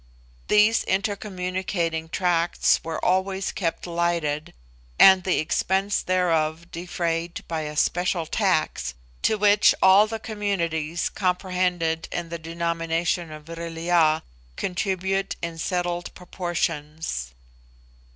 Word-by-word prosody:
These 210 +2 +4
intercommunicating 185 -4 -2
tracts 175 -1 +2
were 165 -1 -4
always 190 +1 +1
kept 170 -4 -3
lighted, 170 -3 -1 0.5
and 190 -1 +8
the 185 - +1
expense 190 +5 0
thereof 170 -2 0
defrayed 170 -1 -3
by 160 -1 -2
a 150 0 -5
special 175 0 +1
tax, 155 - 0 0.3
to 215 - +2
which 205 0 +5
all 195 +3 +6
the 225 +1 -4
communities 175 -7 -2
comprehended 180 -3 -1
in 170 -1 -4
the 170 0 -5
denomination 165 0 -1
of 155 0 -9
Vril 165 0 -7
ya 165 -2 +3 0.3
contribute 190 - -1
in 165 -1 -4
settled 175 0 -2
proportions. 160 - -3
175 Hz, 105 wpm, -24 LUFS, 165-190 Hz, 0.5 s, and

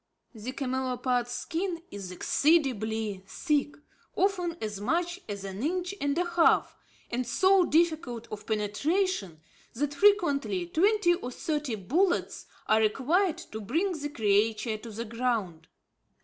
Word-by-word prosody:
The 230 +2 -6
camelopard's 255 -2 -1
skin 335 +7 -3
is 200 -2 -7
exceedingly 220 - +1
thick, 290 - 0 0.4
often 360 -3 0
as 210 -2 -4
much 345 - -1
as 200 -1 -5
an 195 +1 -6
inch 360 +6 -1
and 285 +1 0
a 355 - +2
half 345 -1 +3 0.4
and 245 +1 0
so 375 +9 +4
difficult 310 -8 +1
of 215 - -7
penetration, 215 - -1 0.3
that 290 +4 -1
frequently, 285 - +3
twenty 370 - +3
or 345 -8 -4
thirty 295 -3 -2
bullets 330 - 0 0.2
are 220 - +4
required 300 - +2
to 220 - -5
bring 325 - 0
the 295 -4 -4
creature 220 -1 +1
to 230 - -9
the 225 +2 -5
ground. 225 -8 -2
260 Hz, 130 wpm, -28 LUFS, 215-340 Hz, 0.4 s, so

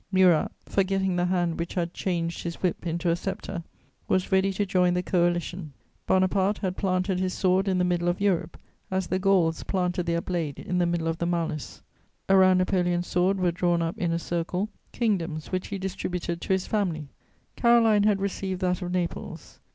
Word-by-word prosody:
Murat, 185 -4 +4
forgetting 190 -1 +1
the 175 0 +1
hand 175 -2 0
which 170 - -4
had 175 -1 -1
changed 170 -3 -2
his 170 -1 -4
whip 180 -1 -2
into 170 +1 0
a - - +2
sceptre, 190 -1 -5 0.4
was 185 +1 0
ready 190 +1 +3
to 205 +2 -1
join 180 -2 +2
the 180 - 0
Coalition. 175 -3 0 0.3
Bonaparte 190 +2 +2
had 185 -2 -2
planted 185 -1 0
his 185 0 -1
sword 190 +1 +2
in 190 -1 +2
the 180 - +2
middle 175 -1 0
of 175 +1 0
Europe, 195 -4 0 0.3
as 190 0 -1
the 185 - -1
Gauls 185 -4 +2
planted 180 -2 -1
their 170 0 +1
blade 170 -5 -3
in 180 0 -2
the 175 - +2
middle 170 -1 -1
of 165 0 -2
the 170 - 0
mallus; 165 -4 -3 0.5
around 190 -1 +6
Napoleon's 180 -1 +1
sword 180 +3 +1
were 180 -1 +2
drawn 175 -1 +1
up 165 +1 -2
in 170 -2 0
a 165 - +1
circle 175 +4 -2 0.2
kingdoms 175 -9 -1
which 185 0 -2
he 200 - -4
distributed 180 -2 -3
to - - -8
his 190 -1 0
family. 170 -9 -1 0.5
Caroline 230 -3 +4
had 205 -1 +3
received 195 -1 -3
that 180 0 0
of 180 -1 -3
Naples. 180 -2 -4
180 Hz, 190 wpm, -26 LUFS, 170-190 Hz, 0.5 s, around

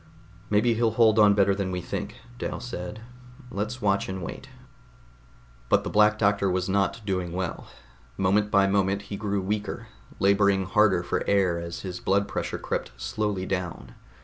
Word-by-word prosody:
"Maybe 110 +3 +3
he'll 115 0 +2
hold 110 -2 +5
on 105 -1 +6
better 100 -1 +4
than 100 -1 -2
we 90 -1 -2
think," - - -6 0.2
Dal - - -3
said. 105 -3 -6 0.5
"Let's 110 +3 -4
watch 100 -1 +1
and 95 -1 -4
wait." - - -7 1.2
But - - +4
the - - -4
Black 105 0 +4
Doctor 100 -2 +2
was 90 0 0
not 100 +3 0
doing 90 -3 -2
well. 90 -5 -4 0.5
Moment 100 +2 +2
by 100 -1 +4
moment 100 0 +1
he 100 0 -6
grew 100 -1 -2
weaker, 105 +2 -3 0.3
laboring 100 -1 +3
harder 95 -2 +3
for - - -1
air 95 -4 +2
as 85 0 -6
his 90 -2 -6
blood 100 +1 +1
pressure - - -3
crept - - -3
slowly 105 -3 -2
down. 90 -10 -4
100 Hz, 165 wpm, -26 LUFS, 95-105 Hz, 1.2 s, on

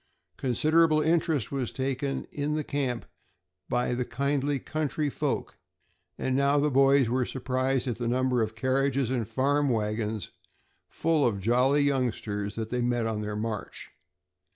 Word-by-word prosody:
Considerable 155 +5 +3
interest 160 -5 +1
was 135 -4 -2
taken 135 +1 -2
in 150 +1 -2
the 155 - -1
camp 135 -5 -2 0.6
by 125 0 0
the 125 +1 0
kindly 140 +3 0
country 150 +1 -2
folk, - - -3 0.6
and 130 - -1
now 140 +1 +3
the 145 +1 +2
boys 135 -1 +5
were 125 +2 +1
surprised 130 +1 -1
at 120 -2 -2
the 120 - -1
number 125 0 +1
of 110 0 -2
carriages 130 +1 +1
and 120 -5 -1
farm 140 +5 +1
wagons, 105 -2 -2 0.6
full 160 -2 +1
of 110 -6 +1
jolly 125 +7 +3
youngsters, 110 -7 -1
that 110 -1 -4
they 125 0 0
met 120 -1 0
on 110 -1 -2
their 105 0 -4
march. 110 0 -5
130 Hz, 150 wpm, -28 LUFS, 115-140 Hz, 0.6 s, boys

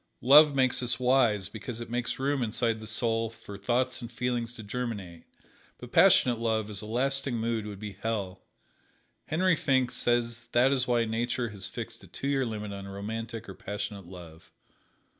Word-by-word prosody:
Love 145 +3 +8
makes 130 -2 +3
us 120 -1 -1
wise 125 -6 +3
because 110 +3 -7
it 120 - -6
makes 120 +1 -2
room 135 0 0
inside 115 0 0
the 110 - -8
soul 115 0 +1
for 105 -2 -11
thoughts 125 +6 0
and 120 0 -7
feelings 120 -1 -2
to 110 - -8
germinate; 105 -7 -5 0.5
but - - -11
passionate 120 -3 +5
love 110 -2 0
as 100 - -4
a 105 - -8
lasting 135 +3 +1
mood 115 -1 -1
would 105 -2 -7
be 105 0 -7
hell. 100 -4 -3 0.9
Henry 180 +2 +2
Finck 130 -4 +1
says 120 -1 0
that 125 +3 +5
is 130 -2 +1
why 120 -2 +2
Nature 120 +2 -1
has 100 -2 -5
fixed - - -7
a - - -13
two 135 - -5
year 135 -3 +1
limit 105 -2 -5
on 100 0 -7
romantic 110 +3 -5
or 95 - -7
passionate 100 -1 -6
love. 85 -3 -12
115 Hz, 180 wpm, -29 LUFS, 105-125 Hz, 0.9 s, Love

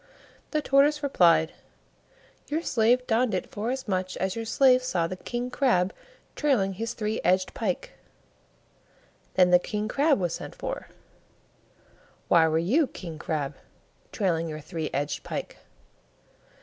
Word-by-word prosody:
The 305 -1 -1
Tortoise 290 +2 +3
replied, 170 - +4 1.0
"Your 315 +3 -2
slave 245 0 +2
donned 230 -2 +1
it 185 - -4
forasmuch 205 -5 -2
as 190 0 -1
your 225 0 -4
slave 255 +2 +4
saw 180 -9 0
the 185 - -4
King 240 +6 -4
crab 195 -10 +2 0.4
trailing 235 -10 +1
his 225 +5 -4
three 215 0 -2
edged 185 +2 +2
pike." 195 -6 -3 1.4
Then 180 -1 +5
the 180 - +7
King 210 +3 -3
crab 285 +3 +2
was 175 -3 -1
sent - - -7
for. - - -5 1.4
"Why 165 -2 +6
were 160 0 +1
you, 250 - +2
King 165 -9 -9
crab, 150 -3 -2 0.6
trailing 165 -5 0
your 155 0 -5
three 160 0 -5
edged 145 +1 -2
pike?" - - -6
200 Hz, 135 wpm, -27 LUFS, 175-255 Hz, 1.4 s, the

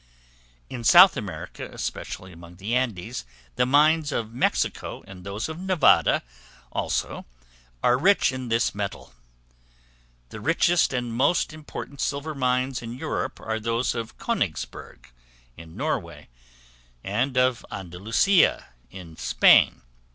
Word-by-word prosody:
In 120 -2 -7
South 180 +9 +8
America, 105 -8 -7
especially 95 - -6
among 85 +1 -13
the 100 +6 -3
Andes; 110 - -2 0.3
the 125 - +2
mines 150 +2 +4
of 115 -4 -3
Mexico, 120 - -1
and 95 -1 -12
those 100 +3 -4
of 160 +1 -7
Nevada, 185 -5 +3 0.5
also, - - -3 0.6
are 125 +1 +3
rich 195 -1 +4
in 130 -2 -6
this 115 +1 +1
metal. 100 -10 -6 1.2
The - - -9
richest 165 +6 +2
and 120 -3 -3
most 145 +7 +1
important 150 -2 -8
silver 145 +2 -2
mines 130 -1 0
in 115 +1 -7
Europe - - -3
are 110 0 -3
those 115 +2 -1
of 115 -2 -6
Königsberg, - - -4 0.5
in 80 0 -13
Norway, - - -4 0.7
and 120 +7 -1
of 125 -2 +2
Andalusia, 100 - +1 0.2
in 85 0 -11
Spain. - - +4
120 Hz, 120 wpm, -25 LUFS, 100-140 Hz, 1.2 s, South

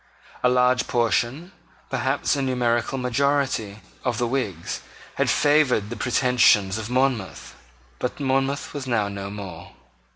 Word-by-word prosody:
A 125 - +4
large 125 0 +3
portion, 120 - 0 0.4
perhaps - - 0
a 140 - -1
numerical 125 -1 0
majority, 130 -5 0 0.2
of 125 -4 -1
the 120 - +1
Whigs 115 -10 -3 0.3
had - - 0
favoured 145 -8 +3
the - - -3
pretensions 120 -6 +3
of 110 0 -6
Monmouth: 125 -6 -1 0.5
but 125 - -3
Monmouth 135 0 0
was 140 -3 -5
now 110 -5 +1
no 100 -1 -6
more. 95 -5 -8
125 Hz, 130 wpm, -24 LUFS, 105-135 Hz, 0.5 s, A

